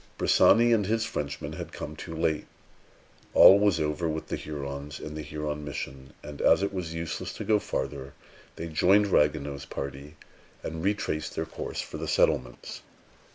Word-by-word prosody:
Bressani 120 +1 +5
and 105 -4 +2
his 115 +1 +1
Frenchmen 75 -10 -4
had - - -7
come 75 - -7
too 80 +2 -7
late. 80 -1 0 0.9
All 100 - +9
was 100 -5 +3
over 75 +2 -1
with 80 0 -4
the - - -1
Hurons 70 -1 -6
and 75 0 -7
the 80 - -4
Huron 75 0 -4
mission; 70 -2 -7
and, 75 -1 -8
as - - +5
it 100 - -1
was 85 -4 -4
useless 80 -1 -4
to - - -6
go 110 -1 +3
farther, 70 -7 -4 0.4
they 80 - -5
joined 95 +6 +4
Ragueneau's 75 -2 +1
party, 70 +2 -7 0.5
and 80 0 -5
retraced 95 -6 -1
their - - -1
course - - -5
for - - -8
the - - -4
settlements. 65 - 0
75 Hz, 165 wpm, -28 LUFS, 75-90 Hz, 0.9 s, All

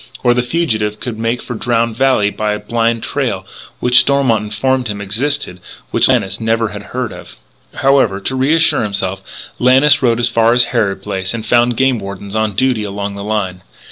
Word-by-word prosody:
Or, 120 -1 +4
the 125 - +1
fugitive 115 -7 -1
could 115 -3 -6
make 115 +2 -2
for - - -6
Drowned 115 -1 0
Valley 130 -5 +2
by 105 0 -2
a 105 - -4
blind 115 +1 -1
trail - - -2 0.3
which, 125 +1 +5
Stormont 135 -6 +2
informed 125 +4 -1
him, 105 -1 -4
existed 105 0 -1
but 90 - -18 0.2
which - - +4
Lannis 95 +3 0
never 115 0 0
had - - -7
heard - - -4
of. - - -12 0.4
However, 135 -8 +2
to 130 +7 -3
reassure 155 +5 +3
himself, 95 -2 -2 0.4
Lannis 135 +4 +5
rode 120 -3 +2
as 120 - +5
far 115 0 +2
as 125 - +5
Harrod 100 -5 0
Place, 95 +3 -3
and 110 -1 -6
found 120 +1 +2
game 130 -3 +2
wardens 100 0 -8
on 110 -1 0
duty 130 0 +1
along 100 0 -4
the 100 0 -7
line. 100 -4 -3
115 Hz, 190 wpm, -15 LUFS, 105-125 Hz, 0.4 s, which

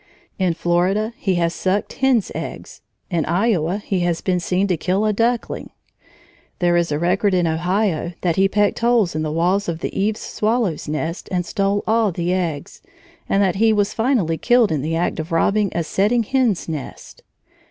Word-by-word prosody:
In 180 -3 +1
Florida 185 +7 0
he 190 -3 -1
has 170 -1 +1
sucked 190 +3 -1
hen's 260 -6 +1
eggs. - - -7 0.3
In 170 -3 +1
Iowa 180 -1 +1
he 200 -2 -2
has 175 -1 0
been 180 -2 0
seen 180 +3 0
to 185 -3 +1
kill 185 +6 0
a 215 - +2
duckling. 235 +3 -1 0.9
There 175 -1 +2
is 170 -2 +1
a 145 - 0
record 185 +4 +1
in 175 -1 +2
Ohio 175 +1 0
that 170 -3 +1
he 195 0 +4
pecked 205 +1 +1
holes 235 -6 +2
in 155 - -2
the 155 -1 -2
walls 180 +5 +1
of 165 -1 -4
the - - -4
eaves 215 +2 0
swallow's 215 -8 -1
nest 160 +3 -4
and 180 -2 -1
stole 200 +2 0
all 220 -2 +2
the 175 +1 -1
eggs, 165 -6 -3 0.5
and 200 - +3
that 190 -1 +1
he 225 +2 +4
was 205 -1 +1
finally 220 - +1
killed 240 -3 +3
in 150 -3 0
the 160 +3 -2
act 170 0 -1
of 160 +2 -5
robbing 200 +4 +2
a 170 - 0
setting 210 +8 +1
hen's 240 -5 0
nest. 155 -5 -7
185 Hz, 185 wpm, -20 LUFS, 170-210 Hz, 0.9 s, he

